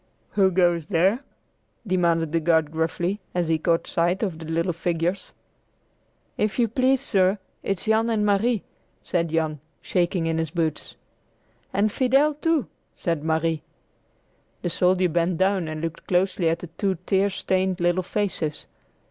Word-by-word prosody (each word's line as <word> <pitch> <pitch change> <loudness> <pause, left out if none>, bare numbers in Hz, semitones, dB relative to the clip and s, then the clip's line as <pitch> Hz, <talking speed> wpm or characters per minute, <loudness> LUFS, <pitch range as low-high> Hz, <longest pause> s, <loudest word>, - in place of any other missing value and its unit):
"Who 195 -2 +4
goes 175 -3 +2
there?" 190 +5 +2 0.7
demanded 170 -4 +1
the 165 - +2
guard 160 -2 +2
gruffly, 170 +4 -1 0.2
as 175 -2 0
he 160 -1 +2
caught 165 +1 +1
sight 175 +4 0
of 180 -6 -2
the 165 - -8
little 165 +3 0
figures. 170 +2 -2 1.0
"If 210 0 0
you 240 -2 +3
please, 255 +3 +2
sir, 190 +1 +2 0.2
it's 195 -3 -2
Jan 220 +1 +2
and 215 -2 +1
Marie," 210 +2 +2 0.4
said 170 -2 0
Jan, 155 -2 -1 0.2
shaking 175 -1 0
in 165 0 0
his 160 -1 -1
boots. 160 -1 -2 0.8
"And 205 +2 +1
Fidel, 270 +6 +3
too," 310 -2 +1 0.3
said 165 -4 -2
Marie. 160 0 0 1.0
The 175 - -1
soldier 180 +1 +3
bent 170 +1 0
down 190 -2 +1
and 155 0 -5
looked 165 0 -5
closely 180 -1 +2
at 165 - +1
the 175 - -8
two 195 -2 +1
tear 195 0 +2
stained 190 -1 0
little 175 +1 +2
faces. 180 -5 -2
180 Hz, 150 wpm, -24 LUFS, 165-200 Hz, 1.0 s, Who